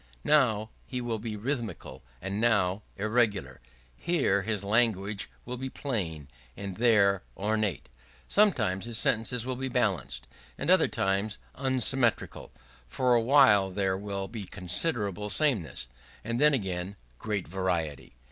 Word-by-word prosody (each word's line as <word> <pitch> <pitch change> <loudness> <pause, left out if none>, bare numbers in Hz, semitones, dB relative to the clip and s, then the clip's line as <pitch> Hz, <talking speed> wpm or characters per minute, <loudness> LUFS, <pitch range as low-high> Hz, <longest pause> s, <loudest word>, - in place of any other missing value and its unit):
Now 110 -8 +2 0.2
he 125 - -4
will 120 -2 -3
be 110 0 -5
rhythmical 115 - -4 0.2
and 100 +2 -3
now 105 -4 +2 0.2
irregular; 105 - 0 0.3
here 130 - +1
his 105 -1 -1
language 105 -2 +1 0.2
will 125 +1 -5
be 130 +1 -4
plain 90 - -3 0.3
and 100 -2 -6
there 100 -5 +4 0.2
ornate; 105 -3 -1 0.4
sometimes 115 - +2
his 120 -1 -2
sentences 115 +1 +1
will 130 0 -2
be 135 +1 -2
balanced 95 - -1 0.3
and - - 0
at - - +10
other - - +4
times 100 +2 -1 0.2
unsymmetrical; 130 -2 0 0.4
for 125 - +1
a 120 - +4
while 110 -6 +5
there 95 0 0
will 100 0 -4
be 110 -4 -7
considerable 105 - 0
sameness, 110 - +1 0.4
and 115 +4 -2
then 150 -1 +6
again 95 -3 -4 0.2
great 105 -4 -3
variety. 80 -8 -3
105 Hz, 135 wpm, -28 LUFS, 95-120 Hz, 0.4 s, at